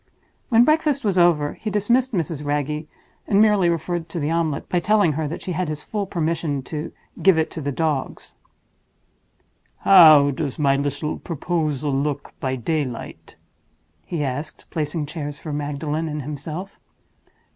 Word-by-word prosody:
When 235 Hz, -1 st, +6 dB
breakfast 305 Hz, -3 st, +2 dB
was 190 Hz, -3 st, +2 dB
over, 160 Hz, -4 st, +3 dB
he 215 Hz, -, -5 dB
dismissed 235 Hz, +6 st, +1 dB
Mrs. 165 Hz, -, -2 dB
Wragge, 150 Hz, +1 st, -2 dB, 0.4 s
and 200 Hz, -, +3 dB
merely 210 Hz, -5 st, +4 dB
referred 170 Hz, 0 st, -2 dB
to 170 Hz, -, -4 dB
the 150 Hz, +1 st, -1 dB
omelette 165 Hz, -3 st, -1 dB
by 180 Hz, -, +1 dB
telling 205 Hz, -2 st, +3 dB
her 155 Hz, +1 st, -2 dB
that 160 Hz, -, -6 dB
she 185 Hz, -, -4 dB
had 180 Hz, +1 st, -1 dB
his 150 Hz, -1 st, -4 dB
full 205 Hz, -2 st, -3 dB
permission 160 Hz, -5 st, -1 dB
to 150 Hz, +3 st, -5 dB, 0.3 s
"give 190 Hz, -3 st, +5 dB
it 160 Hz, -, 0 dB
to 160 Hz, -, -6 dB
the 145 Hz, 0 st, -2 dB
dogs." 150 Hz, -1 st, -2 dB, 1.5 s
"How 155 Hz, -7 st, +8 dB
does 140 Hz, -1 st, -3 dB
my 140 Hz, -2 st, +3 dB
little 145 Hz, +2 st, -2 dB
proposal 155 Hz, -4 st, -2 dB
look 145 Hz, +1 st, -2 dB
by 130 Hz, -1 st, -1 dB
daylight?" 130 Hz, -1 st, -4 dB, 0.7 s
he 155 Hz, -, -3 dB
asked, 145 Hz, +3 st, -5 dB
placing 150 Hz, 0 st, -2 dB
chairs 145 Hz, -1 st, -6 dB
for 155 Hz, -, -6 dB
Magdalen 150 Hz, +2 st, -2 dB
and 150 Hz, -2 st, -4 dB
himself. 150 Hz, +7 st, -6 dB
155 Hz, 155 wpm, -22 LUFS, 145-175 Hz, 1.5 s, How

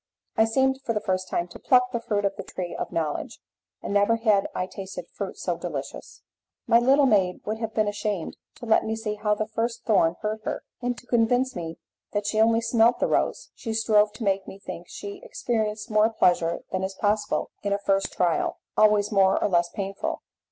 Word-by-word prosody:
I 220 Hz, -, +5 dB
seemed 265 Hz, +4 st, +1 dB
for 230 Hz, -, -1 dB
the 210 Hz, -, 0 dB
first 185 Hz, -3 st, -2 dB
time 175 Hz, -, -1 dB
to -, -, -11 dB
pluck 250 Hz, -1 st, +3 dB
the 235 Hz, -, -1 dB
fruit 210 Hz, -3 st, -1 dB
of 195 Hz, 0 st, 0 dB
the -, -, -5 dB
tree 180 Hz, -2 st, -6 dB
of -, -, -4 dB
knowledge, 155 Hz, -3 st, -2 dB, 0.5 s
and -, -, -3 dB
never 205 Hz, +3 st, +4 dB
had 215 Hz, -4 st, +2 dB
I 180 Hz, -, 0 dB
tasted 190 Hz, +1 st, -7 dB
fruit -, -, -5 dB
so -, -, -2 dB
delicious. -, -, -6 dB, 0.4 s
My 230 Hz, -, +5 dB
little 270 Hz, +4 st, +5 dB
maid 190 Hz, -7 st, +2 dB
would 215 Hz, +1 st, -3 dB
have 220 Hz, -2 st, -4 dB
been 215 Hz, -1 st, +2 dB
ashamed 205 Hz, -4 st, -2 dB, 0.2 s
to -, -, -9 dB
let 225 Hz, -, +4 dB
me 220 Hz, -, -2 dB
see 220 Hz, -1 st, -3 dB
how 210 Hz, 0 st, 0 dB
the 215 Hz, -, -1 dB
first 225 Hz, +2 st, -3 dB
thorn 175 Hz, -6 st, +3 dB
hurt 215 Hz, +1 st, -2 dB
her, -, -, -3 dB, 0.2 s
and 245 Hz, 0 st, -1 dB
to 245 Hz, -, -13 dB
convince 245 Hz, +2 st, +2 dB
me 165 Hz, -2 st, -5 dB, 0.4 s
that 205 Hz, -1 st, -1 dB
she 215 Hz, +1 st, +1 dB
only 225 Hz, +1 st, +4 dB
smelt 230 Hz, +1 st, +3 dB
the -, -, +1 dB
rose, -, -, 0 dB
she 225 Hz, -2 st, -5 dB
strove 215 Hz, -1 st, +3 dB
to 220 Hz, -, -7 dB
make 195 Hz, -1 st, 0 dB
me 190 Hz, -, -9 dB
think 175 Hz, -3 st, -8 dB
she 200 Hz, 0 st, -8 dB
experienced 220 Hz, -1 st, -2 dB
more 215 Hz, +1 st, +4 dB
pleasure 175 Hz, -6 st, +2 dB
than 185 Hz, -, -1 dB
is 190 Hz, 0 st, -3 dB
possible 210 Hz, +1 st, 0 dB
in 200 Hz, -, -2 dB
a 200 Hz, -, +2 dB
first 195 Hz, -1 st, 0 dB
trial, 175 Hz, -3 st, 0 dB, 0.2 s
always 210 Hz, -1 st, +4 dB
more 195 Hz, -2 st, +4 dB
or -, -, +1 dB
less 175 Hz, -2 st, +2 dB
painful. 195 Hz, 0 st, -4 dB
210 Hz, 210 wpm, -25 LUFS, 195-225 Hz, 0.5 s, I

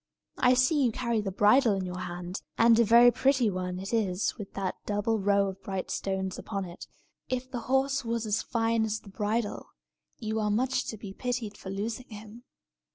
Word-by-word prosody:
I 250 Hz, 0 st, +5 dB
see 265 Hz, +3 st, +3 dB
you 240 Hz, -, +3 dB
carry 235 Hz, -1 st, -1 dB
the 195 Hz, -2 st, -3 dB
bridle 210 Hz, +3 st, +4 dB
in 190 Hz, -1 st, -2 dB
your 180 Hz, 0 st, -5 dB
hand; 180 Hz, +1 st, -5 dB, 0.2 s
and 230 Hz, 0 st, +6 dB
a -, -, +7 dB
very 235 Hz, +2 st, +7 dB
pretty 260 Hz, -4 st, +2 dB
one 180 Hz, -1 st, -3 dB
it 195 Hz, +4 st, -6 dB
is 200 Hz, -3 st, 0 dB
with 205 Hz, -4 st, -9 dB
that 195 Hz, -2 st, -2 dB
double 210 Hz, +2 st, 0 dB
row 200 Hz, 0 st, +3 dB
of 190 Hz, 0 st, -9 dB
bright 190 Hz, -1 st, -4 dB
stones 190 Hz, -1 st, -2 dB
upon 195 Hz, -3 st, -4 dB
it. 175 Hz, 0 st, -10 dB, 0.4 s
If 255 Hz, 0 st, -3 dB
the 250 Hz, -, -3 dB
horse 270 Hz, +1 st, +2 dB
was 230 Hz, -1 st, -2 dB
as 215 Hz, +1 st, 0 dB
fine 230 Hz, -1 st, 0 dB
as 220 Hz, 0 st, -2 dB
the 200 Hz, -, -13 dB
bridle, 210 Hz, +2 st, -2 dB, 0.5 s
you 220 Hz, -1 st, -2 dB
are 210 Hz, -1 st, 0 dB
much 255 Hz, +5 st, +1 dB
to 220 Hz, -, -5 dB
be 200 Hz, -2 st, -8 dB
pitied 240 Hz, -3 st, -3 dB
for 190 Hz, -, -9 dB
losing 220 Hz, +6 st, -4 dB
him." 220 Hz, +3 st, -11 dB
215 Hz, 200 wpm, -28 LUFS, 195-235 Hz, 0.5 s, a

